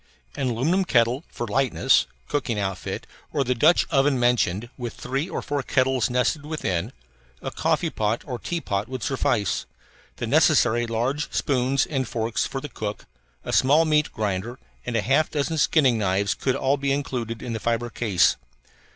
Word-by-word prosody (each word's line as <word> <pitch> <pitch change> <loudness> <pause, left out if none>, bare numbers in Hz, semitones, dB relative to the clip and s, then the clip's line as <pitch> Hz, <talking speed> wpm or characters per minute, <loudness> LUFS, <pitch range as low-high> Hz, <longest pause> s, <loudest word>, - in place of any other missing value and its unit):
An 135 -3 -1
aluminum 155 +12 +1 0.5
(for 120 - -5
lightness) 130 +3 +2 0.2
cooking 130 -6 -1
outfit, 95 -3 -3 0.3
or 145 - +1
the 125 0 +1
Dutch 155 +8 +4
oven 135 -1 +3
mentioned, 120 -3 +1
with 120 -3 -6
three 135 +7 -3
or - - -4
four 145 -1 -1
kettles 130 -3 +1
nested 125 +5 0
within, 110 - -2 0.5
a - - -5
coffee - - 0
pot 110 +2 -1
or 125 -4 -4
a - - -17
teapot 105 - -3
would 130 -3 -5
suffice. 110 -6 0 0.5
The - - -4
necessary 120 -4 +3
large 125 +6 -1
spoons 135 0 +1
and 135 -5 -2
forks 115 -1 -1
for 135 - -4
the 150 - -6
cook, 105 -5 -5 0.4
a - - -3
small 150 +5 +5
meat 150 -1 +2
grinder, 105 +3 -3 0.3
and 120 - -2
a 110 - +1
half 140 - +2
dozen 155 +2 -1
skinning 135 -7 +3
knives 100 0 +1
could 130 - -1
all 135 +2 +1
be 140 0 -1
included 125 -5 -3
in 120 -2 -4
the 110 - -3
fibre 120 +1 -1
case. 95 -7 +2
125 Hz, 170 wpm, -24 LUFS, 115-140 Hz, 0.5 s, small